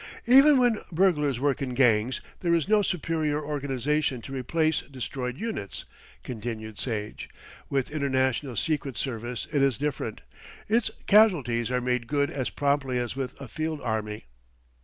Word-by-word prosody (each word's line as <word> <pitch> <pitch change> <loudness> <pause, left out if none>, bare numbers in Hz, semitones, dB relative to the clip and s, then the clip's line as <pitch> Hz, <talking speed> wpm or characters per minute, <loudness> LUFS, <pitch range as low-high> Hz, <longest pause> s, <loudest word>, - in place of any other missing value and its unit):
"Even 275 +4 +7
when 245 -4 +3
burglars 155 -7 +2
work 140 -1 +1
in 130 -2 -3
gangs, 120 -1 +3 0.2
there 170 -1 +2
is 165 -1 0
no 215 0 +4
superior 160 -5 0
organisation 140 -1 -1
to 135 - -8
replace 155 +5 +1
destroyed 130 -1 -5
units," 220 - -5 0.4
continued 110 -2 -6
Sage. 105 -4 -4 0.4
"With 135 -1 -1
international 130 -3 0
secret 145 -4 -1
service 120 -2 -3
it 145 - +3
is 135 -5 +3
different; 140 -6 -3 0.5
its 225 +2 +2 0.2
casualties 145 - +4
are 125 0 0
made 125 -1 -1
good 145 +2 +1
as 130 -8 -2
promptly 140 +2 0
as 120 0 -2
with 135 -2 -5
a 135 - -7
field 155 +4 -3
army." 105 - -3
135 Hz, 145 wpm, -27 LUFS, 125-155 Hz, 0.5 s, Even